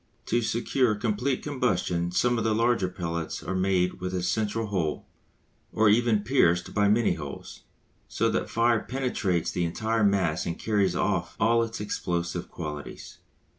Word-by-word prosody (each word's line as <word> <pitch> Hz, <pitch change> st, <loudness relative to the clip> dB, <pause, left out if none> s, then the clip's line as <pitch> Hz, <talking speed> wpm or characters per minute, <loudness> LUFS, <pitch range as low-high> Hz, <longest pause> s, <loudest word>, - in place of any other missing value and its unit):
To 120 Hz, +1 st, +1 dB
secure 120 Hz, 0 st, +1 dB
complete 120 Hz, +5 st, -1 dB
combustion 90 Hz, -11 st, 0 dB
some 120 Hz, +6 st, +1 dB
of -, -, -1 dB
the 110 Hz, -1 st, +1 dB
larger 115 Hz, -4 st, +2 dB
pellets 85 Hz, -2 st, -4 dB
are -, -, -3 dB
made 95 Hz, -1 st, +1 dB
with 90 Hz, 0 st, -3 dB
a 90 Hz, -, -2 dB
central 110 Hz, +5 st, -1 dB
hole, 90 Hz, -7 st, -2 dB, 0.7 s
or 110 Hz, -1 st, +3 dB
even 110 Hz, -1 st, +3 dB
pierced 90 Hz, -8 st, +2 dB
by 105 Hz, 0 st, +3 dB
many 110 Hz, +3 st, +3 dB
holes, -, -, -8 dB, 0.4 s
so -, -, 0 dB
that -, -, +1 dB
the -, -, -8 dB
fire 115 Hz, 0 st, +2 dB
penetrates 120 Hz, -10 st, -1 dB
the 90 Hz, -, -1 dB
entire 110 Hz, +6 st, 0 dB
mass 95 Hz, -5 st, +1 dB
and 85 Hz, -, -3 dB
carries 100 Hz, -5 st, +1 dB
off 90 Hz, -2 st, -1 dB
all 115 Hz, +2 st, +4 dB
its 115 Hz, 0 st, -3 dB
explosive 85 Hz, -4 st, -3 dB
qualities. 75 Hz, -4 st, -7 dB
105 Hz, 160 wpm, -27 LUFS, 90-115 Hz, 0.7 s, all